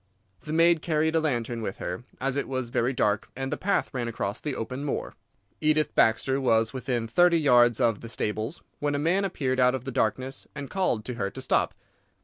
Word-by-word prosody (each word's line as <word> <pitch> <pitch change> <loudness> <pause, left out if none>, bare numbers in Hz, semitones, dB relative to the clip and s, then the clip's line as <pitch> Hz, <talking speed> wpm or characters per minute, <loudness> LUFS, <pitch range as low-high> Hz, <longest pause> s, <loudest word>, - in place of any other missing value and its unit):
The 150 - -7
maid 165 0 +4
carried 160 -1 +1
a - - +5
lantern 120 -6 -1
with 100 -3 -4
her, 90 +7 -5
as 135 0 -1
it 140 - -1
was 130 -2 -3
very 120 0 +1
dark 105 -5 0
and 135 0 -4
the - - 0
path 200 -4 0
ran 125 -3 -2
across 105 -3 -3
the 145 -3 -3
open 130 +5 -4
moor. 145 - -3 0.5
"Edith 155 -1 +2
Baxter 130 +5 +2
was 115 -2 +2
within 125 -3 -2
thirty 175 +8 +4
yards 120 -6 +5
of 115 -4 +2
the 115 - -8
stables, 110 +6 -3 0.2
when 145 0 0
a - - +1
man 175 +7 +1
appeared 135 -8 -1
out 125 0 +4
of 130 - -5
the 135 - -4
darkness 130 +4 -1
and 140 -2 -6
called 155 - 0
to 125 - -4
her 100 - 0
to - - -9
stop. - - +1
130 Hz, 210 wpm, -27 LUFS, 115-150 Hz, 0.5 s, a